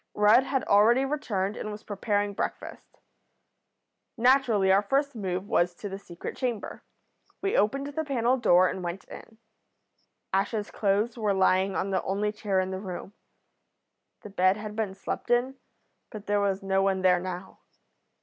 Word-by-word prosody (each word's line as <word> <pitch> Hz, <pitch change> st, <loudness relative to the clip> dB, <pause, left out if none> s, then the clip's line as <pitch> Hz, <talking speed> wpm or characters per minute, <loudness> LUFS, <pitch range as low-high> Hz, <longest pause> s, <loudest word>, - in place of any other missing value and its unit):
Rudd 215 Hz, +5 st, +5 dB
had 270 Hz, -1 st, -1 dB
already 230 Hz, +6 st, +4 dB
returned, 215 Hz, -9 st, -2 dB
and 215 Hz, -, -5 dB
was 210 Hz, 0 st, -8 dB
preparing 205 Hz, 0 st, -1 dB
breakfast. -, -, -6 dB, 1.2 s
Naturally 235 Hz, -6 st, +3 dB
our 195 Hz, +1 st, +5 dB
first 275 Hz, +6 st, 0 dB
move 190 Hz, -2 st, -3 dB
was 175 Hz, -2 st, +1 dB
to 205 Hz, -, -7 dB
the 195 Hz, 0 st, -6 dB
secret 170 Hz, -3 st, -8 dB
chamber. 245 Hz, -5 st, -4 dB, 0.6 s
We 395 Hz, -, 0 dB
opened 275 Hz, +7 st, +1 dB
the 290 Hz, +2 st, -3 dB
panel 255 Hz, -3 st, +1 dB
door 185 Hz, -6 st, +5 dB
and 185 Hz, -, -4 dB
went 175 Hz, +2 st, -5 dB
in. 220 Hz, -, -12 dB, 1.0 s
Ash's 205 Hz, +2 st, -1 dB
clothes 210 Hz, +4 st, 0 dB
were 210 Hz, -3 st, +1 dB
lying 190 Hz, 0 st, +2 dB
on 195 Hz, -, -1 dB
the 190 Hz, -, +1 dB
only 205 Hz, +2 st, -1 dB
chair 205 Hz, -2 st, -1 dB
in 185 Hz, 0 st, -1 dB
the 190 Hz, -, -4 dB
room. 190 Hz, 0 st, -7 dB, 1.1 s
The 210 Hz, -, -9 dB
bed 185 Hz, +1 st, +3 dB
had 210 Hz, 0 st, -7 dB
been 210 Hz, -3 st, -2 dB
slept 195 Hz, -, -5 dB
in, 250 Hz, +2 st, +1 dB, 0.5 s
but 215 Hz, -2 st, -9 dB
there 205 Hz, 0 st, +1 dB
was 195 Hz, -1 st, -1 dB
no 195 Hz, 0 st, +1 dB
one 190 Hz, -1 st, 0 dB
there 180 Hz, -1 st, +4 dB
now. 185 Hz, +1 st, -7 dB
205 Hz, 160 wpm, -27 LUFS, 190-230 Hz, 1.2 s, Rudd